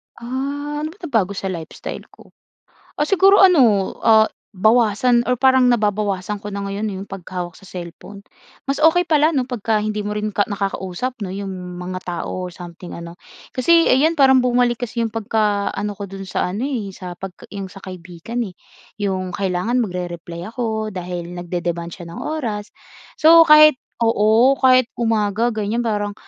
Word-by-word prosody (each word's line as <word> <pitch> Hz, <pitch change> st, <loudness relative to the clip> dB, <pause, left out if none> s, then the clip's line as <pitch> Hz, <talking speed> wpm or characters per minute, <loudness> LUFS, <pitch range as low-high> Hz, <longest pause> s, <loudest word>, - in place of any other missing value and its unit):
Ah, 280 Hz, +4 st, -4 dB
ano 305 Hz, -, -2 dB
ba -, -, -24 dB
nabago 220 Hz, -, 0 dB
sa 190 Hz, 0 st, -3 dB
lifestyle 165 Hz, -3 st, -7 dB
ko? -, -, -19 dB, 0.7 s
Ah, 295 Hz, -, +1 dB
siguro 390 Hz, +3 st, +5 dB
ano, 250 Hz, -, +5 dB
ah, 220 Hz, -1 st, +6 dB, 0.3 s
bawasan 235 Hz, +4 st, +3 dB
or 250 Hz, -, +2 dB
parang 260 Hz, 0 st, +4 dB
nababawasan 210 Hz, -4 st, 0 dB
ko 205 Hz, -, -11 dB
na 200 Hz, -1 st, -4 dB
ngayon 200 Hz, +2 st, -3 dB
eh, -, -, -5 dB
yung 200 Hz, -, -13 dB
paghawak 180 Hz, -2 st, -6 dB
sa 195 Hz, -, -16 dB
cellphone. 180 Hz, +3 st, -9 dB, 0.5 s
Mas 275 Hz, -, -1 dB
okey 320 Hz, +3 st, +5 dB
pala 315 Hz, -2 st, +2 dB
'no, 265 Hz, -, +2 dB
pagka 220 Hz, -3 st, 0 dB
hindi 215 Hz, 0 st, -2 dB
mo 210 Hz, -, -2 dB
rin 210 Hz, 0 st, -2 dB
ka 205 Hz, 0 st, 0 dB
nakakausap 200 Hz, +4 st, -3 dB
'no, 185 Hz, -, -6 dB
yung 200 Hz, 0 st, -5 dB, 0.2 s
mga 180 Hz, +1 st, -5 dB
tao 180 Hz, +1 st, -4 dB
o 180 Hz, -, -10 dB
something 175 Hz, 0 st, -10 dB
ano. 170 Hz, +1 st, -9 dB, 0.3 s
Kasi 330 Hz, +6 st, +3 dB
'yan 305 Hz, +6 st, +4 dB
parang 265 Hz, -4 st, +5 dB
bumalik 245 Hz, -1 st, +2 dB
kasi 240 Hz, -1 st, -3 dB
yung 225 Hz, -, -1 dB
pagkaano 210 Hz, -2 st, -1 dB
ko 200 Hz, -, -5 dB
do'n 195 Hz, 0 st, -8 dB
sa 190 Hz, -, -2 dB
ano 215 Hz, -, -3 dB
eh, 235 Hz, -8 st, -3 dB
sa 180 Hz, -2 st, -8 dB
pagka 190 Hz, -2 st, -9 dB
yung 200 Hz, -1 st, -5 dB
sa 190 Hz, +1 st, -13 dB
kaibigan 185 Hz, +6 st, -6 dB
eh. 185 Hz, -, -11 dB, 0.5 s
Yung 185 Hz, -2 st, -2 dB
kailangan 195 Hz, +6 st, 0 dB
magre-reply 175 Hz, -3 st, -5 dB
ako 220 Hz, -3 st, -2 dB
dahil 175 Hz, -1 st, -5 dB
nagde-demand 175 Hz, -1 st, -4 dB
siya 175 Hz, 0 st, -10 dB
ng -, -, -7 dB
oras. 230 Hz, -9 st, -4 dB, 0.5 s
So, 330 Hz, +2 st, +8 dB
kahit, 305 Hz, -1 st, +8 dB, 0.3 s
oo, 225 Hz, +4 st, +4 dB
kahit 255 Hz, -2 st, +4 dB
umaga 225 Hz, 0 st, +1 dB
ganiyan 220 Hz, +1 st, -2 dB
parang, 205 Hz, -3 st, -2 dB
210 Hz, 170 wpm, -20 LUFS, 185-250 Hz, 0.7 s, So